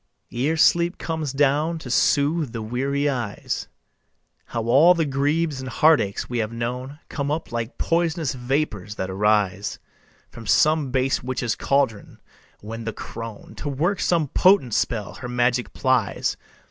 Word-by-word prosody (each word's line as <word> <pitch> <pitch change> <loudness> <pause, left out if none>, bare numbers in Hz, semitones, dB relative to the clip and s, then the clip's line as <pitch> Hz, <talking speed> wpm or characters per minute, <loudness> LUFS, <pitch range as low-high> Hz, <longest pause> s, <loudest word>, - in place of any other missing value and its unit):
Ere 145 +7 0
sleep 170 +2 +3
comes 160 -4 -3
down 145 +4 +1
to 135 -6 -7
soothe 145 +1 +2
the 115 - -4
weary 135 +5 -1
eyes, 120 -7 -3 0.8
How 115 - -3
all 140 +10 +6
the 165 -2 +1
griefs 145 +2 0
and 130 -1 -5
heartaches 135 -8 +3
we 120 -1 -2
have 110 0 -1
known 125 +4 -4
Come 140 -1 -3
up 155 -1 -3
like 115 +2 -4
pois'nous 165 -3 0
vapors 125 -6 -2
that 95 -2 -3
arise 105 0 +1 0.5
From 115 -2 -10
some 155 -2 +3
base 130 +1 +1
witch's 125 -2 -2
caldron, 135 -7 -1 0.4
when 115 +2 -7
the 115 -1 -4
crone, 115 0 -8
To 145 - -4
work 170 +8 0
some 165 -5 +1
potent 185 - +4
spell, 105 -3 -1
her 125 - -7
magic 125 0 +1
plies. 130 -6 0
130 Hz, 145 wpm, -23 LUFS, 115-155 Hz, 0.8 s, all